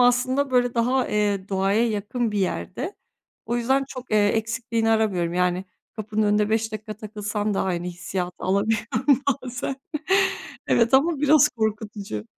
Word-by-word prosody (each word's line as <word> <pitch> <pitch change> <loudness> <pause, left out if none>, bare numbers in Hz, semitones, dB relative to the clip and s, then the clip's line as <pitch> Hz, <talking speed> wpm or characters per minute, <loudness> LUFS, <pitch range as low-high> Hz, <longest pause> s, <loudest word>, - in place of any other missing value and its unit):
aslında, 255 +3 +3
böyle, 245 -1 +2
daha, 250 +2 +1
eee, 205 -2 0
doğaya 195 +4 +2
yakın 220 +2 -2
bir 210 - -1
yerde. 240 - -2 0.5
O 240 - -1
yüzden 265 +3 +1
çok, 255 -2 -9
eee, 210 -1 +4
eksikliğini 225 +1 0
aramıyorum. 190 -6 +1
Yani, 180 +1 +1 0.3
kapının 215 0 -1
önünde 210 0 +2
5 220 0 0
dakika 215 0 -6
takılsam 210 -1 -3
da - - +1
aynı 175 -2 -2
hissiyatı 180 0 -4
alabiliyorum 220 +8 +1 0.2
bazen. 250 +1 -4 0.9
Evet, 235 +2 +3
ama 305 +3 +4
biraz 300 -1 +6
korkutucu. 210 - -3
220 Hz, 140 wpm, -24 LUFS, 205-245 Hz, 0.9 s, biraz